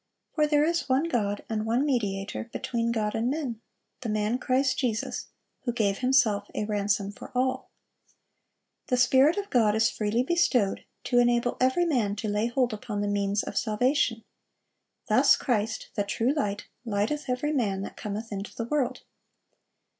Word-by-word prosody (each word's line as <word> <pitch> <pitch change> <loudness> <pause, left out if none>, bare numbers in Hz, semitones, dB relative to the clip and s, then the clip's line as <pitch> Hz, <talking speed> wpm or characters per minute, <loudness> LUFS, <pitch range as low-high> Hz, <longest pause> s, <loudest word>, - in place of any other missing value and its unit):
For 305 -1 +2
there 295 0 +3
is 335 -1 0
one 260 +3 +3
God, 210 -11 -1
and 215 -1 -2
one 235 +5 +1
mediator 205 -8 -1
between 235 0 -1
God 215 -2 -1
and 230 +2 0
men, 265 -6 -3 0.4
the 240 - -5
man 215 +3 0
Christ 260 +1 +1
Jesus; 230 -5 -2 0.3
who 245 - -2
gave 205 -4 0
Himself 245 -6 +2
a 210 - -1
ransom 205 -1 0
for - - -11
all."(378) 260 +1 -7
The 250 - +1
Spirit 265 +7 +5
of 405 0 -3
God 220 -5 +3
is 220 0 +3
freely 215 +3 0
bestowed, 255 - +1 0.2
to 245 -1 +2
enable 240 0 +2
every 260 +7 +3
man 235 -11 +1
to 215 +1 -4
lay 210 +2 0
hold 245 -1 0
upon 210 -1 -4
the 205 - -1
means 205 0 0
of - - -6
salvation. 230 +1 +1 0.8
Thus - - +5
Christ, 225 -4 -1
"the 205 - 0
true 230 +6 0
Light," 205 -9 -2 0.2
"lighteth 225 +6 -1
every 255 +4 0
man 200 -8 0
that - - -7
cometh 215 +2 -5
into 200 0 -6
the 230 - -3
world." 275 +1 -1
230 Hz, 165 wpm, -27 LUFS, 210-260 Hz, 0.8 s, Spirit